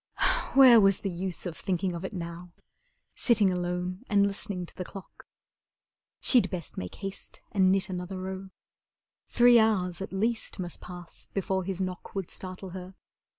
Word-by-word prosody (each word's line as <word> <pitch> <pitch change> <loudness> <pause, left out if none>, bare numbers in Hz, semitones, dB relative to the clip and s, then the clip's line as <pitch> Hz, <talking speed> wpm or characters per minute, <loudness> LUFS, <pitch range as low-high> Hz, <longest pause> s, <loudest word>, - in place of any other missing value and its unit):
Where 255 -4 +9
was 195 -1 +4
the 195 - -2
use 180 +1 -4
of 175 -3 -4
thinking 185 0 -1
of 170 +1 -5
it 190 - -4
now, 170 -1 -7 0.6
Sitting 215 -6 +3
alone 180 +1 -2
and 200 -1 +4
listening 195 -2 -2
to - - -15
the 180 - -4
clock! 195 +1 -12 0.9
She'd 250 -3 +4
best 175 -4 -4
make 90 - -6
haste 195 -1 -7
and 190 -2 +4
knit 195 0 +2
another 185 0 -5
row. 190 +1 -6 0.8
Three 240 0 +6
hours 190 -5 +1
at 195 - -5
least 225 +4 -1
must 175 -3 -5
pass 175 -1 -10
before 190 -1 0
his 190 -1 -3
knock 185 0 -5
Would 195 -3 -3
startle 185 0 -7
her. 185 +1 -8
190 Hz, 160 wpm, -28 LUFS, 180-195 Hz, 0.9 s, Where